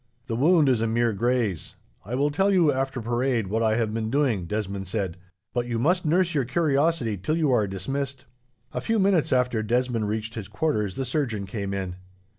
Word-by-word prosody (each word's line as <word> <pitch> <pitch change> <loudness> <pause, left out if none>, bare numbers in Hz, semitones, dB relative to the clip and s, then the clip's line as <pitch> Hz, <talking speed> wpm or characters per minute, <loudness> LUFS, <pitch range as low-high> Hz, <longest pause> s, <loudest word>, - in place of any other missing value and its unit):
"The 115 -4 -3
wound 155 +4 +4
is 125 -4 +3
a 115 - +1
mere 115 0 +1
graze. 115 -5 -1 0.3
I 115 +6 -4
will 145 +3 +1
tell 195 +7 +2
you, 175 -6 +4
after 135 -1 -2
parade, 120 0 0
what 110 +4 -1
I 110 -1 +2
have 110 -2 0
been 110 -1 -2
doing," 120 - +1
Desmond 100 -1 -3
said, 95 -3 -2 0.4
"but 120 -1 -1
you 120 -1 -1
must 175 +9 +1
nurse 175 +2 +2
your 140 -3 +2
curiosity 140 -4 +1
till 155 - -1
you 155 -5 +2
are 110 -5 +3
dismissed." 135 +8 -4 0.5
A - - -2
few 225 0 0
minutes 190 -5 +2
after 125 -3 +2
Desmond 120 0 0
reached 110 +1 -3
his 110 -4 -6
quarters, 105 -4 -1
the 135 - -2
surgeon 120 -10 -1
came 100 0 -4
in. 95 -2 -4
120 Hz, 200 wpm, -25 LUFS, 105-140 Hz, 0.5 s, wound